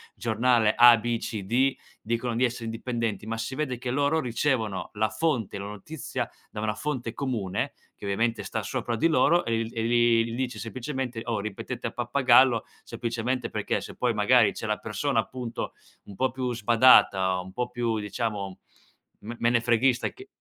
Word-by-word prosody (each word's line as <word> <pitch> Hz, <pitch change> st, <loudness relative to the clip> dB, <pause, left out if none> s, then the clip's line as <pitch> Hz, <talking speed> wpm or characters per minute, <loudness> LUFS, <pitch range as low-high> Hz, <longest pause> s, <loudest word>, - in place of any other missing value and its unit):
giornale 115 Hz, -1 st, +2 dB
a, 120 Hz, 0 st, +9 dB
b, 120 Hz, +1 st, -1 dB
c, 105 Hz, -3 st, -4 dB
d, 130 Hz, +6 st, +2 dB, 0.3 s
dicono 115 Hz, +1 st, -2 dB
di 125 Hz, +2 st, +3 dB
essere 120 Hz, -1 st, -4 dB
indipendenti, 115 Hz, -1 st, -3 dB
ma 115 Hz, 0 st, -3 dB
si 115 Hz, +4 st, -4 dB
vede 140 Hz, -5 st, -2 dB
che 125 Hz, +1 st, -4 dB
loro 145 Hz, +4 st, +1 dB
ricevono 115 Hz, -5 st, -1 dB
la 110 Hz, +1 st, 0 dB
fonte, 125 Hz, -, -1 dB
la 100 Hz, -, -5 dB
notizia 105 Hz, +9 st, -5 dB, 0.2 s
da 105 Hz, -, -6 dB
una 110 Hz, 0 st, 0 dB
fonte 130 Hz, -6 st, -3 dB
comune 115 Hz, -8 st, -2 dB, 0.2 s
che -, -, -10 dB
ovviamente 115 Hz, +4 st, 0 dB
sta -, -, -3 dB
sopra 120 Hz, -, -2 dB
di 115 Hz, -, +3 dB
loro 170 Hz, +2 st, +4 dB
e 115 Hz, 0 st, -1 dB
e 115 Hz, -, -2 dB
li 120 Hz, -1 st, +3 dB
gli -, -, -4 dB
dice 125 Hz, -2 st, -3 dB
semplicemente: 125 Hz, 0 st, -4 dB
"Oh, 110 Hz, -3 st, -1 dB
ripetete 115 Hz, +4 st, -5 dB
a -, -, -5 dB
pappagallo." 120 Hz, -1 st, +4 dB, 0.2 s
Semplicemente 120 Hz, +2 st, -3 dB
perché -, -, -2 dB
se -, -, -9 dB
poi 125 Hz, -2 st, +1 dB
magari 110 Hz, 0 st, +4 dB
c'è -, -, -6 dB
la 105 Hz, 0 st, 0 dB
persona, 115 Hz, +4 st, -1 dB
appunto, 120 Hz, 0 st, -4 dB, 0.3 s
un 100 Hz, -, -11 dB
po' 130 Hz, +6 st, 0 dB
più 125 Hz, 0 st, -2 dB
sbadata 110 Hz, -5 st, +5 dB
o -, -, -5 dB
un 95 Hz, -, -11 dB
po' 125 Hz, +2 st, -2 dB
più, 120 Hz, -2 st, -1 dB
diciamo, 105 Hz, -2 st, -4 dB, 0.6 s
me 115 Hz, +3 st, -7 dB
menefreghista 120 Hz, +1 st, +2 dB
che 390 Hz, -, -13 dB
120 Hz, 175 wpm, -26 LUFS, 110-125 Hz, 0.6 s, a